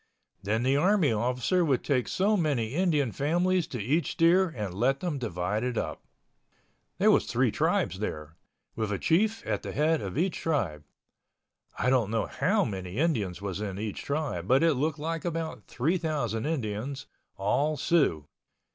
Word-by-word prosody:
Then 110 Hz, +4 st, 0 dB
the 130 Hz, +2 st, +3 dB
army 180 Hz, -, +3 dB
officer 125 Hz, -, +1 dB
would 140 Hz, -6 st, +1 dB
take 130 Hz, -4 st, +1 dB
so 205 Hz, +3 st, +2 dB
many 140 Hz, -, 0 dB
Indian 155 Hz, -7 st, +1 dB
families 175 Hz, +6 st, +1 dB
to 125 Hz, -, -5 dB
each 145 Hz, +11 st, 0 dB
steer 175 Hz, +3 st, +4 dB
and 105 Hz, -, -5 dB
let 130 Hz, +8 st, +1 dB
them 165 Hz, -5 st, -2 dB
divide 105 Hz, -1 st, -2 dB
it 125 Hz, -2 st, -2 dB
up. -, -, -3 dB, 1.0 s
There -, -, +5 dB
was -, -, +3 dB
three -, -, +2 dB
tribes 90 Hz, +2 st, 0 dB
there, 80 Hz, -6 st, -5 dB, 0.4 s
with 110 Hz, -2 st, -2 dB
a 100 Hz, -, 0 dB
chief 215 Hz, -, +1 dB
at 105 Hz, -2 st, -1 dB
the -, -, -6 dB
head 155 Hz, +2 st, +2 dB
of 100 Hz, +4 st, -5 dB
each 175 Hz, +2 st, 0 dB
tribe. 95 Hz, -, -1 dB, 0.9 s
I 125 Hz, -, +1 dB
don't 120 Hz, -6 st, +2 dB
know 110 Hz, -1 st, 0 dB
how 195 Hz, +7 st, +1 dB
many 95 Hz, -1 st, -5 dB
Indians 110 Hz, -, 0 dB
was 100 Hz, 0 st, -3 dB
in 100 Hz, -3 st, -4 dB
each 105 Hz, 0 st, -4 dB
tribe 140 Hz, -, -3 dB
but 130 Hz, +6 st, +4 dB
it 165 Hz, -1 st, +4 dB
looked 150 Hz, +3 st, -1 dB
like 165 Hz, +2 st, -3 dB
about 165 Hz, -2 st, -4 dB
3,000 145 Hz, -, -1 dB
Indians—all 135 Hz, +1 st, -2 dB
Siouxs. 140 Hz, -, +2 dB
135 Hz, 165 wpm, -28 LUFS, 105-165 Hz, 1.0 s, There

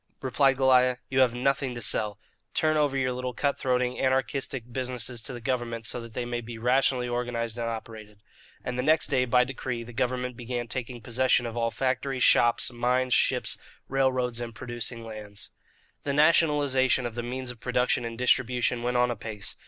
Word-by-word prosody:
replied 135 Hz, +1 st, +2 dB
Goliah. 130 Hz, -1 st, +4 dB
"You 130 Hz, -, +1 dB
have 125 Hz, -2 st, +4 dB
nothing 130 Hz, 0 st, 0 dB
to 120 Hz, -, -6 dB
sell. 105 Hz, -1 st, +1 dB, 0.4 s
Turn 155 Hz, 0 st, +2 dB
over 145 Hz, -3 st, +2 dB
your 130 Hz, -1 st, +1 dB
little 125 Hz, -1 st, -4 dB
cut 140 Hz, +2 st, 0 dB
throating, 125 Hz, -1 st, 0 dB
anarchistic 130 Hz, -1 st, 0 dB
businesses 125 Hz, -2 st, -3 dB
to 115 Hz, -, -4 dB
the 120 Hz, -, -6 dB
government 120 Hz, -2 st, -2 dB
so 120 Hz, -, -1 dB
that 115 Hz, -1 st, -11 dB
they 125 Hz, -, -2 dB
may 120 Hz, 0 st, -3 dB
be 115 Hz, 0 st, -8 dB
rationally 125 Hz, +1 st, +2 dB
organized 120 Hz, -2 st, -2 dB
and 115 Hz, 0 st, -1 dB
operated." 110 Hz, -2 st, -8 dB, 0.4 s
And 125 Hz, 0 st, -3 dB
the -, -, +3 dB
next 155 Hz, +4 st, +3 dB
day, 130 Hz, -2 st, +3 dB
by 125 Hz, 0 st, +4 dB
decree, 125 Hz, -2 st, -4 dB
the 120 Hz, +1 st, -11 dB
government 125 Hz, 0 st, -1 dB
began 120 Hz, 0 st, -4 dB
taking 120 Hz, 0 st, -4 dB
possession 120 Hz, +2 st, +2 dB
of 115 Hz, -1 st, -5 dB
all 115 Hz, -1 st, +1 dB
factories, 130 Hz, +1 st, -1 dB
shops, 120 Hz, +1 st, +4 dB
mines, 125 Hz, +1 st, +1 dB
ships, -, -, +1 dB, 0.3 s
railroads, 130 Hz, -3 st, +1 dB
and 115 Hz, -2 st, -6 dB
producing 120 Hz, +1 st, -3 dB
lands. 105 Hz, -2 st, -6 dB, 0.5 s
The 140 Hz, -, -2 dB
nationalization 145 Hz, -4 st, +3 dB
of 120 Hz, -, -3 dB
the 120 Hz, -, -3 dB
means 125 Hz, +1 st, -4 dB
of 120 Hz, -, -13 dB
production 125 Hz, 0 st, +1 dB
and 115 Hz, -1 st, -5 dB
distribution 125 Hz, -1 st, +2 dB
went 125 Hz, +1 st, 0 dB
on 125 Hz, 0 st, +3 dB
apace. 110 Hz, -3 st, -6 dB
125 Hz, 185 wpm, -27 LUFS, 120-130 Hz, 0.5 s, Goliah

